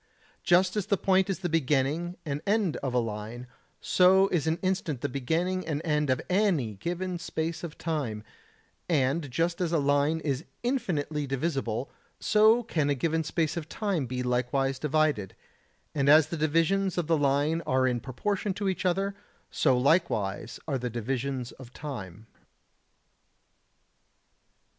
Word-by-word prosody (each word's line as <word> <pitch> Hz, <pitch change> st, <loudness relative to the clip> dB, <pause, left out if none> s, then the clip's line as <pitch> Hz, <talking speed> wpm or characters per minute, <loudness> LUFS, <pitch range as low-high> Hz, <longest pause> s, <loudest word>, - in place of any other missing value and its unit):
Just 180 Hz, +2 st, +3 dB
as 210 Hz, -3 st, -1 dB
the 200 Hz, -, +2 dB
point 190 Hz, +1 st, +2 dB
is 195 Hz, -, 0 dB
the 180 Hz, -, 0 dB
beginning 155 Hz, +2 st, 0 dB
and 145 Hz, -1 st, -3 dB
end 205 Hz, -5 st, +2 dB
of 130 Hz, -2 st, -3 dB
a -, -, +4 dB
line, 115 Hz, +1 st, -3 dB, 0.4 s
so 190 Hz, +1 st, +5 dB
is 160 Hz, -4 st, 0 dB
an 160 Hz, +1 st, +1 dB
instant 185 Hz, -8 st, -1 dB
the -, -, 0 dB
beginning 165 Hz, +8 st, -1 dB
and 150 Hz, -3 st, -1 dB
end 150 Hz, -2 st, +1 dB
of 130 Hz, -, +2 dB
any 180 Hz, -, +1 dB
given 175 Hz, -, -3 dB
space 165 Hz, 0 st, -3 dB
of 165 Hz, -3 st, -7 dB
time; 135 Hz, -10 st, -3 dB, 0.7 s
and 145 Hz, 0 st, +1 dB
just 170 Hz, +7 st, -1 dB
as 170 Hz, -2 st, 0 dB
a 170 Hz, -, +3 dB
line 145 Hz, +2 st, +2 dB
is 140 Hz, -2 st, -2 dB, 0.2 s
infinitely 155 Hz, -, -1 dB
divisible, 135 Hz, -3 st, -2 dB, 0.3 s
so 220 Hz, +3 st, +4 dB
can 155 Hz, -10 st, 0 dB
a 145 Hz, -, +2 dB
given 160 Hz, +4 st, 0 dB
space 160 Hz, 0 st, -1 dB
of 165 Hz, -2 st, -5 dB
time 195 Hz, -, -1 dB
be 125 Hz, +1 st, -3 dB
likewise 125 Hz, +2 st, 0 dB
divided, 150 Hz, -9 st, 0 dB, 0.6 s
and 140 Hz, -2 st, +1 dB
as 155 Hz, 0 st, +7 dB
the -, -, -3 dB
divisions 165 Hz, +5 st, +1 dB
of 175 Hz, -, +1 dB
the 165 Hz, +1 st, +2 dB
line 145 Hz, +3 st, +1 dB
are 130 Hz, 0 st, +2 dB
in 125 Hz, -2 st, +1 dB
proportion 190 Hz, -, -2 dB
to 205 Hz, 0 st, -2 dB
each 185 Hz, -1 st, 0 dB
other, 195 Hz, +3 st, 0 dB, 0.4 s
so 130 Hz, -4 st, +3 dB
likewise 125 Hz, -, +1 dB
are 140 Hz, -4 st, -1 dB
the 125 Hz, 0 st, -3 dB
divisions 125 Hz, +2 st, -3 dB
of 130 Hz, -2 st, -13 dB
time. 110 Hz, -, -7 dB
155 Hz, 155 wpm, -28 LUFS, 130-175 Hz, 0.7 s, as